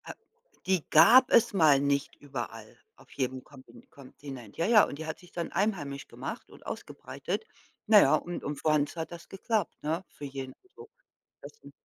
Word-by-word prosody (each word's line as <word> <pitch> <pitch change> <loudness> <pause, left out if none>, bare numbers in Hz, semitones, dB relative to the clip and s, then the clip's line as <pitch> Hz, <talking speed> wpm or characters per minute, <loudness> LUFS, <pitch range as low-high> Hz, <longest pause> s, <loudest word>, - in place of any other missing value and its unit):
Äh, - - -7 0.5
die 185 -4 +1
gab 255 +2 +7
es 235 -2 +4
mal 155 -7 +5
nicht 140 0 -1
überall, 120 -6 -8 0.2
auf - - -21
jedem 130 -1 -3
Kompi 130 -4 -16
Kontinent. 135 -5 -12
Ja, 165 - 0
ja, 215 -1 +6
und 140 - -3
die 160 - -5
hat 160 - -6
sich 180 0 -18
dann 170 -1 -4
einheimisch 160 -10 -2
gemacht - - -7
und - - -17
ausgebreitet. - - -6 0.4
Na 215 -1 +8
ja, 140 +3 +5
und 175 +3 -5
und 145 - -3
für 150 - -4
uns 150 0 +1
hat 160 -1 -5
das 170 -1 -10
geklappt, 205 0 -2
ne, 160 +5 -2
für 145 - -10
jeden, 135 -1 -7 0.2
so. 450 -1 -13 0.5
Das - - -11
'n - - -13
150 Hz, 185 wpm, -29 LUFS, 135-185 Hz, 0.5 s, Na